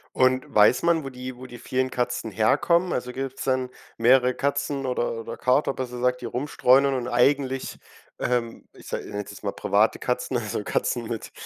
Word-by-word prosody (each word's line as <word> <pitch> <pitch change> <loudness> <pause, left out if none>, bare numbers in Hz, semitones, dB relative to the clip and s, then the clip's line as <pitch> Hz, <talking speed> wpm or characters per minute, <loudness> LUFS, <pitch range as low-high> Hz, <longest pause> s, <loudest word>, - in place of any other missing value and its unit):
Und 130 0 +3
weiß 105 +4 +5
man 170 -3 +2
wo 135 - -5
die 125 0 -7
wo 130 +1 -10
die 120 -1 -10
vielen 130 +2 -1
Katzen 125 -2 -2
herkommen, 170 - +2
also, 125 0 -3
gibt's 135 +1 -5
dann 130 -1 0 0.3
mehrere 125 +1 +4
Katzen 140 -1 -1
oder 125 -2 -1
oder - - -7
Kater 130 +2 +2
besser 125 -2 -5
gesagt 125 0 0
die - - -6
rumstreunern 135 +2 +3
und 125 -2 -2
eigentlich, 135 +2 +1 0.4
ähm, 120 -2 -2
ich - - -16
sa - - -3
ich - - -10
nenne 105 0 -4
es - - -11
jetzt - - -12
mal - - -2
private 105 +2 +2
Katzen, 125 0 -2
also 110 -2 -3
Katzen 120 +2 -1
mit 115 -2 -5
125 Hz, 195 wpm, -25 LUFS, 120-135 Hz, 0.4 s, weiß